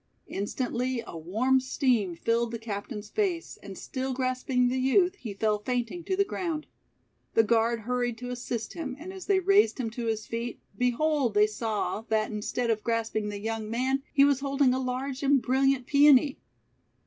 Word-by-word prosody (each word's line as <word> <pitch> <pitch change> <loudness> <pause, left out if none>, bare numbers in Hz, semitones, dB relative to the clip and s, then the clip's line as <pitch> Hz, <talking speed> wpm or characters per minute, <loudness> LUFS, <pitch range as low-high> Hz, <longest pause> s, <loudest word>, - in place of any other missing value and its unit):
Instantly 245 +4 -2
a - - -9
warm 220 +11 +1
steam 250 -8 +1
filled 230 +6 0
the 230 - -4
captain's 210 -1 -6
face, 370 -6 -1
and 195 -2 -9
still 260 0 -4
grasping 255 -1 +1
the 255 +1 0
youth, 355 +8 +3
he 225 - -6
fell 210 +1 0
fainting 245 +8 -2
to 380 - -1
the 400 - +3
ground. 335 -6 -3 0.7
The 225 - +6
guard 230 +1 +2
hurried 245 0 -1
to 245 +1 -6
assist 240 -2 -4
him, 285 -6 -5
and 355 +6 -8
as 380 -1 -9
they 390 -1 +4
raised 395 +3 +4
him 230 -3 -2
to 235 0 -4
his 220 -1 -1
feet, 230 +1 -4 0.2
behold, 250 +2 +1
they 210 0 +6
saw 215 0 -2
that, 220 0 +1
instead 230 +3 -1
of 220 -1 -1
grasping 225 -2 -1
the 205 -1 -5
young 220 0 -3
man, 260 +4 0
he 275 - +5
was 285 -2 +3
holding 275 -2 +2
a 260 - 0
large 260 +1 -3
and 280 -1 +4
brilliant 265 +1 +2
Peony! 280 0 +5
250 Hz, 180 wpm, -28 LUFS, 225-275 Hz, 0.7 s, The